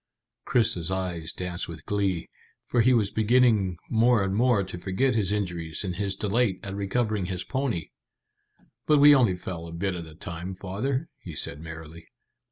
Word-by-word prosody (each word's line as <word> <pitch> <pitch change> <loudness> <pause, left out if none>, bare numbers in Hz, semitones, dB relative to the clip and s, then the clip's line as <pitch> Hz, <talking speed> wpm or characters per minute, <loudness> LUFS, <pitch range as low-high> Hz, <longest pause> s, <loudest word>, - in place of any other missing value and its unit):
Chris's 95 -8 +2
eyes 90 -4 -2
danced 90 -1 -4
with 80 -2 -9
glee, 100 -4 -1 0.4
for 120 - +2
he 125 - +4
was 110 -5 +3
beginning 110 -5 +3
more 115 -1 +3
and 95 0 -1
more 120 -2 +3
to 95 -2 -7
forget 100 +9 +1
his 105 -4 +1
injuries 85 -6 -2
in 95 -3 -2
his 100 0 -1
delight 105 -1 +1
at 95 - -5
recovering 100 0 -1
his 90 -2 -3
pony. 130 - -2 1.0
"But 150 - +5
we 145 +1 +9
only 120 -9 +4
fell 85 -2 -6
a - - -8
bit 90 +3 -2
at 85 -2 -6
a 80 - -13
time, 85 +3 -6
father," 130 - -2
he 90 - -9
said 70 -1 -3
merrily. 80 0 -9
95 Hz, 175 wpm, -27 LUFS, 85-115 Hz, 1.0 s, we